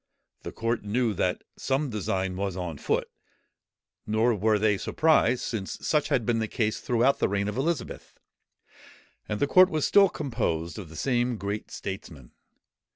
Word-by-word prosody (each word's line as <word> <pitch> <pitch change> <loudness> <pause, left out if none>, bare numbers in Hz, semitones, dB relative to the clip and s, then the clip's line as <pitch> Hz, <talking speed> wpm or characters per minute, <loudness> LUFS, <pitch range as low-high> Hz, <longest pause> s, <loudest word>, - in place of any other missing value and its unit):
The - - -7
court 115 +1 -1
knew 110 +2 0
that - - -1
some 135 0 -1
design 95 -3 -2
was 95 -1 -3
on 85 -5 -5
foot: - - 0 1.0
nor 110 +3 +2
were 105 +1 +2
they 105 -1 +2
surprised, 155 -6 +2
since 100 -5 -4
such 150 -2 +2
had 130 -7 +1
been 115 0 +1
the 110 - -1
case 110 0 -1
throughout 125 +3 +2
the - - +2
reign 100 0 0
of 105 - -3
Elizabeth; 155 +6 -3 1.1
and 105 - -2
the - - +3
court 185 +5 +6
was 155 -4 0
still 200 -2 +6
composed 115 - -2
of 90 -6 -9
the 80 - -12
same 120 +2 0
great 100 +1 -4
statesmen. 80 -9 -7
110 Hz, 160 wpm, -27 LUFS, 100-130 Hz, 1.1 s, court